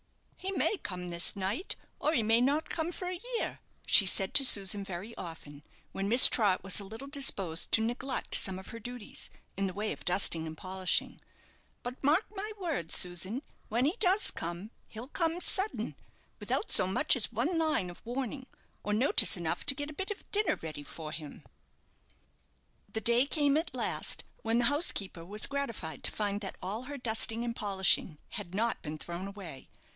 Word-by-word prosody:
"He 385 - -4
may 420 - +1
come 180 - -6
this 170 +3 +2
night, 200 - -3 0.2
or 305 - +1
he 235 - +2
may 225 +2 +4
not 285 +5 +1
come 325 +1 -2
for 360 +1 -6
a 360 0 -5 0.2
year," - - -2 0.3
she 200 - +7
said 190 +1 +1
to 280 - +5
Susan 200 -5 +4
very 195 +4 -7
often, 150 -4 -9 0.3
when 195 +1 -3
Miss 240 +3 +11
Trott 200 -6 +3
was 195 +2 +2
a - - -6
little 225 +7 -9
disposed 200 - 0
to 225 - +4
neglect 255 +3 -3
some 190 -1 +5
of 190 - -10
her 230 - -8
duties, 245 -1 -7 0.3
in 195 0 -1
the 185 - -5
way 210 +1 -2
of - - -7
dusting 175 -3 +3
and 160 0 -8
polishing; 185 0 -1 0.6
"but 250 +3 -7
mark 310 +9 +3
my 415 +2 -4
words, 305 - -1
Susan, 185 - 0 0.3
when 235 +4 +1
he 315 +7 +1
does 390 +1 +3
come, 175 +6 -6 0.2
he'll 230 +3 -9
come 330 +1 -1
sudden, 385 +3 0 0.5
without - - -2
so - - +6
much 235 +12 +2
as 240 -2 0
one 270 - -1
line 305 - +1
of 175 - -15
warning, 260 +2 -5 0.4
or 210 - -1
notice 220 -2 +4
enough 170 0 -3
to 280 - +6
get 290 +2 -5
a - - -10
bit 385 +6 -5
of 415 - -7
dinner 420 0 +2
ready 155 -2 -6
for 155 +1 -8
him." 155 -2 -9 1.5
The 220 - -3
day 235 +5 +3
came 290 -1 +2
at 320 +3 -1
last - - 0 0.2
when 225 +1 0
the 240 - +3
housekeeper 220 - 0
was 205 +5 0
gratified 255 -12 -4
to - - -2
find 205 -1 -2
that 195 - -6
all 210 +7 -5
her 285 +1 -6
dusting 225 -1 +2
and 235 -1 -3
polishing 190 -6 +2
had 190 -4 -5
not 230 +2 0
been 155 0 -6
thrown 175 +4 -6
away. 190 -9 -10
220 Hz, 190 wpm, -31 LUFS, 185-280 Hz, 1.5 s, Miss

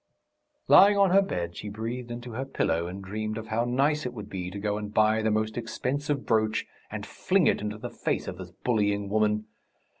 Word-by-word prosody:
Lying 205 +1 +8
on 195 -2 +5
her 195 +2 +6
bed 85 - -3
she 105 - -6
breathed 115 +4 -5
into 120 +1 -6
her 125 +4 -3
pillow 85 -10 0
and 95 +2 -7
dreamed 110 +2 -3
of 110 -1 -7
how 115 +2 +1
nice 140 +5 +1
it 125 -1 -4
would 105 -2 -8
be 90 -2 -4
to 100 - -7
go 105 0 -1
and 105 -1 -6
buy 110 +1 +3
the 110 - +1
most 110 +1 0
expensive 135 +5 -2
brooch 110 -1 +1 0.2
and - - -5
fling - - +1
it - - +3
into 105 0 -3
the 120 +2 -6
face - - -2
of - - -6
this - - -7
bullying 105 -4 0
woman. 105 0 +1
110 Hz, 210 wpm, -27 LUFS, 105-125 Hz, 0.2 s, Lying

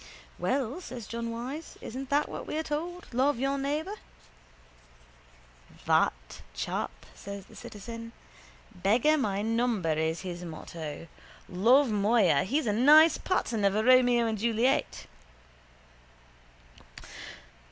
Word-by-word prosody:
—Well, 270 +5 -1
says 240 - -8
John 230 +2 -4
Wyse. 255 +8 -6
Isn't 260 +3 -7
that 290 +1 +2
what - - -7
we're 315 +1 -2
told. 335 +4 -4
Love 265 +2 +2
your 275 +3 0
neighbour. 300 +7 -2 1.9
—That - - 0
chap? - - -2 0.2
says 200 -1 -8
the - - -17
citizen. 230 +2 -9 0.6
Beggar 225 +11 +3
my 205 -8 -1
neighbour 225 -7 0
is 160 +1 -1
his 180 -2 -6
motto. 160 -1 -7 0.4
Love, 235 +8 +4
moya! 205 -7 +3
He's 275 +8 0
a 210 - +1
nice 300 +8 +6
pattern 230 - -1
of 200 0 +3
a 215 - +1
Romeo 245 -1 +5
and 220 -2 -2
Juliet. 230 - 0
235 Hz, 115 wpm, -29 LUFS, 200-275 Hz, 1.9 s, nice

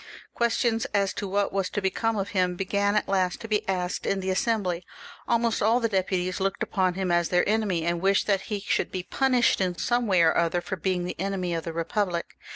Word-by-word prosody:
Questions 235 -1 +1
as 200 -1 +2
to 200 - -4
what 200 +1 0
was 195 -2 0
to - - -2
become 215 +3 0
of 200 0 -2
him 180 -2 +1
began 200 +2 0
at 210 - +1
last 185 -2 0
to 225 - -6
be 215 -1 +1
asked 180 -1 -2
in 195 - +1
the 190 0 -2
Assembly; 185 -4 0 0.4
almost 235 -1 +1
all 225 +4 +3
the 230 - +1
deputies 185 -2 -1
looked 195 0 -1
upon 185 -3 0
him 190 -2 -1
as 175 -1 +2
their 180 0 +2
enemy, 205 -6 +1
and 170 0 0
wished 195 +1 +3
that 195 -2 +1
he 205 -2 -2
should - - -1
be 185 -1 -3
punished 250 -1 +2
in 180 -2 0
some 240 -1 0
way 185 -4 +4
or 160 - +4
other 170 +1 +2
for 190 - -4
being 180 0 -1
the 180 - -6
enemy 185 -2 -2
of 165 -1 -3
the 165 - -3
Eepublic. 170 +2 -2
190 Hz, 225 wpm, -26 LUFS, 180-210 Hz, 0.4 s, way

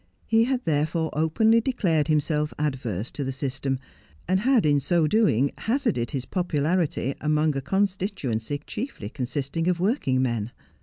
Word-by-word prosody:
He 225 0 +3
had, 255 0 -1
therefore, 160 +1 0
openly 220 +10 +3
declared 180 - +1
himself 150 0 0
adverse 125 -8 -2
to 145 - -4
the 135 - -2
system, 135 0 -2 0.5
and 185 +2 +2
had 245 - +3
in 145 -1 +4
so 165 +4 +2
doing 150 - +3
hazarded 225 - 0
his 135 -4 -3
popularity 165 -4 0
among 150 0 +2
a 135 - -1
constituency 145 - -1
chiefly 215 - -5
con 125 0 -4
sisting 145 +5 -2
of 180 -2 +1
working 185 - +1
men. 115 -4 -1
155 Hz, 150 wpm, -25 LUFS, 135-190 Hz, 0.5 s, in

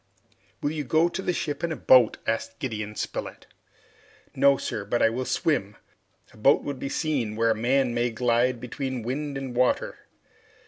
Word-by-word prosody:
"Will 145 - +1
you 155 -1 -3
go 160 +5 +2
to 190 - -4
the 180 - 0
ship 150 -3 -3
in 170 - 0
the 160 - -2
boat?" 125 -5 +5
asked 115 0 -2
Gideon 105 -5 -4
Spilett. - - -5 0.9
"No, 140 -1 +4
sir, 105 - -4
but 115 +4 -1
I 115 - +4
will 130 +2 -3
swim. 105 -12 -1 0.6
A - - -17
boat 135 +6 +4
would 140 -2 -5
be 140 - -4
seen 135 -8 -1
where 115 +1 +2
a - - +1
man 125 +2 +1
may 120 +1 +1
glide 120 +1 +1
between 125 0 -4
wind 140 +4 -3
and 135 -2 -6
water." 125 0 0
125 Hz, 180 wpm, -26 LUFS, 115-140 Hz, 0.9 s, boat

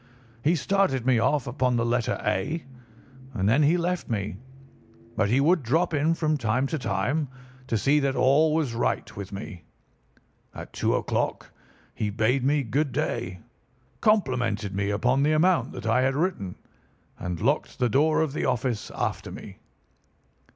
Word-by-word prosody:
He 160 +4 +3
started 170 -8 +1
me 130 -3 +4
off 145 +4 +1
upon 125 0 0
the 115 0 +1
letter 120 0 0
A, 105 - -1 0.7
and 95 -2 0
then 125 +8 +4
he 155 +4 +4
left 180 -1 -2
me; 100 -4 -2 0.8
but 110 -2 +1
he 125 +5 +3
would 165 +4 +3
drop 160 +8 +1
in 155 +3 +2
from 155 -2 0
time 120 +3 +1
to 155 +3 -2
time 125 +8 -1 0.4
to 115 - 0
see 140 +7 +3
that 135 -2 0
all 145 +4 +4
was 150 -7 0
right 115 -1 -1
with 100 -1 -7
me. 100 -4 -7 0.9
At - - -9
two - - +1
o'clock - - -2 0.4
he 105 - -2
bade 115 +5 +1
me 145 +1 +2
good 135 +5 0
day, 105 -9 -3 0.6
complimented 125 - +1
me 100 +1 -1
upon 125 +6 +1
the 150 +2 +3
amount 175 +3 +3
that 125 -3 -7
I 115 +3 +3
had 130 +1 +1
written, 145 - -1 0.6
and 90 -2 -4
locked 140 - 0
the 125 - +2
door 150 +8 +3
of 155 -4 -1
the - - -2
office 125 -3 -1
after - - -3
me. - - -10
130 Hz, 165 wpm, -26 LUFS, 110-155 Hz, 0.9 s, me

